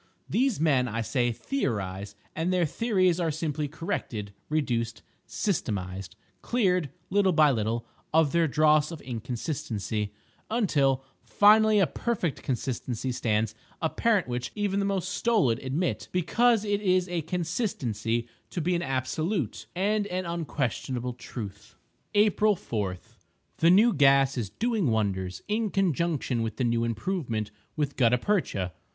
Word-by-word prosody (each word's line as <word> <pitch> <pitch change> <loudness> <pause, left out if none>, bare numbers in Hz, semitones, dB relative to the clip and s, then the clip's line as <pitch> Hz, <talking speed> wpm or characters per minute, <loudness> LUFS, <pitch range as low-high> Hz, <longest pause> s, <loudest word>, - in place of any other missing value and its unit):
These 255 - +1
men, 140 -5 +3
I 115 0 -2
say, 120 +1 +1
theorize; 100 - -3 0.2
and 165 +3 0
their 180 -2 +3
theories 185 -1 +1
are 170 -2 +1
simply 150 -1 -2
corrected, 125 - -4 0.2
reduced, 120 -7 -1 0.2
systematized—cleared, 145 - -2 0.2
little 195 -1 +3
by 155 -2 +6
little, 115 0 -1 0.3
of 160 -2 +4
their 170 -1 +3
dross 150 0 +4
of 165 -2 -7
inconsistency—until, 125 - -2 0.2
finally, 215 +1 +5
a 195 - +5
perfect 185 - -2
consistency 125 0 -2
stands 110 -2 0 0.3
apparent 195 - +1
which 125 0 -3
even 205 -2 0
the 200 - +1
most 195 -2 -1
stolid 200 - +2
admit, 140 +7 -2
because 220 +5 +3
it 205 0 0
is 185 -2 +2
a 175 -2 -1
consistency, 140 - -2 0.2
to - - -4
be 175 +3 +1
an 170 - 0
absolute 150 - -2
and 205 +3 +1
an 185 -1 -3
unquestionable 135 -6 -2
truth. 105 -4 -8 0.4
April 210 0 +4
4.—The 105 - -3
new 210 +6 +6
gas 135 -2 +5
is 115 -6 -2
doing 220 - 0
wonders, 95 -5 -1
in 215 +1 0
conjunction 170 -9 0
with 110 -1 -3
the - - 0
new 115 -1 +1
improvement 115 - -2 0.2
with 145 -2 -1
gutta 125 -1 +4
percha. 120 - -1
150 Hz, 130 wpm, -27 LUFS, 115-185 Hz, 0.4 s, by